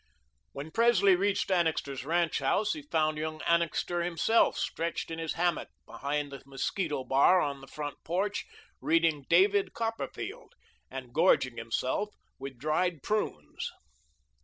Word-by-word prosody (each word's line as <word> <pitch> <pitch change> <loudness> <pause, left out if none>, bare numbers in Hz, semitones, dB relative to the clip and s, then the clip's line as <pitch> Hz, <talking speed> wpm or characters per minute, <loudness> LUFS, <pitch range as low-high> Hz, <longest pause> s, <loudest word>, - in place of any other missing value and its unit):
When 145 +3 -7
Presley 200 -3 +5
reached 200 +1 0
Annixter's 160 -7 0
ranch 170 +2 +1
house, 205 +10 +1
he 305 - -6
found 155 - 0
young 155 0 -3
Annixter 170 +1 +1
himself 175 +6 +2
stretched 165 0 -2
in 165 - -4
his 160 -1 -2
hammock 175 0 0 0.2
behind 145 0 -3
the 140 - -8
mosquito 140 +2 -2
bar 140 +8 +5
on 140 -4 -2
the 135 - -12
front 145 +1 -6
porch, 195 +5 -1 0.3
reading 160 -4 +2
"David 195 +3 +4
Copperfield," 400 - -5 0.3
and 130 -2 -8
gorging 130 -7 +3
himself 130 - -2 0.2
with 135 -1 -7
dried 155 +3 0
prunes. 210 - -2
165 Hz, 135 wpm, -30 LUFS, 140-190 Hz, 0.3 s, Presley